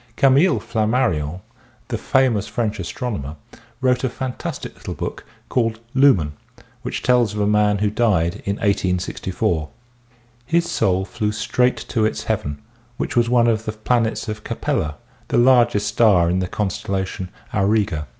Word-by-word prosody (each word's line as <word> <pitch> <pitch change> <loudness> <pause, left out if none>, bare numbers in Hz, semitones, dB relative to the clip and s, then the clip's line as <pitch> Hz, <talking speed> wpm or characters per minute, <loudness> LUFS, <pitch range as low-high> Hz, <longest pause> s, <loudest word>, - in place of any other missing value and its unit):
Camille 140 +7 +4
Flammarion, 105 - 0 0.5
the - - -1
famous 125 -6 +2
French 110 -3 -2
astronomer, 85 - -4 0.5
wrote 125 -1 +2
a 130 - +1
fantastic 130 +1 -5
little - - -7
book - - -5 0.2
called 115 -2 0
" - - -34
Lumen 90 - +4 0.2
" - - -25
which - - -4
tells 120 -4 +3
of - - -3
a 105 - +2
man 105 0 +3
who 105 0 0
died 105 -5 +1
in 100 - -1
1864. 90 -5 -1 0.8
His 170 +2 +2
soul 95 0 +1
flew 110 -1 -2
straight 125 +3 +1
to 115 - +1
its 110 - 0
heaven 75 0 -2 0.4
which - - -3
was 120 -1 +3
one 120 -1 +4
of 110 -1 +1
the 110 - -3
planets 115 +1 0
of 105 0 -5
Capella, 75 0 -2 0.3
the - - 0
largest 120 -4 +4
star 100 -6 +4
in 90 - +1
the 90 - -1
constellation 95 -1 -3 0.2
Auriga. 100 -7 +1
105 Hz, 150 wpm, -21 LUFS, 95-120 Hz, 0.8 s, Camille